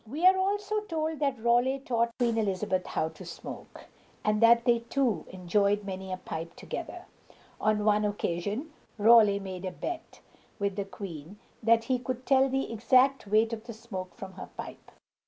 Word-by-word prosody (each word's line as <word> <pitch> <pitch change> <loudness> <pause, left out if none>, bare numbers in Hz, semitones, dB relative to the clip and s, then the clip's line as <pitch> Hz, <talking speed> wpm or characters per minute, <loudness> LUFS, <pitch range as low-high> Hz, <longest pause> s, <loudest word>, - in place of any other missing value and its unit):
We 300 +10 -2
are 375 +1 +8
also 410 +2 0
told 320 -6 -3
that 275 -4 0
Raleigh 240 +3 +3
taught 235 -3 -1
Queen 240 -2 +1
Elizabeth 190 -2 -1
how 160 - -1
to - - -12
smoke, - - -9 0.4
and 210 0 +2
that 235 +1 +6
they 240 -2 +4
two 235 - 0
enjoyed 200 +3 +1
many 190 -1 -6
a 185 - -2
pipe 165 -2 -6
together. - - -7 0.5
On 210 -1 +1
one 210 0 +3
occasion 205 - -2 0.2
Raleigh 215 -2 +6
made 190 -2 -7
a 185 - -2
bet 340 - -6 0.4
with 200 -2 -1
the 200 -1 -2
queen 185 -2 -8 0.2
that 225 0 +4
he 255 +1 0
could 255 0 -5
tell 270 0 +4
the 270 -3 -1
exact 255 +3 +3
weight 220 +3 +3
of 225 0 -6
the 235 - -7
smoke 200 -5 -7
from 190 -1 -8
her - - -9
pipe. - - -8
225 Hz, 175 wpm, -29 LUFS, 200-255 Hz, 0.5 s, are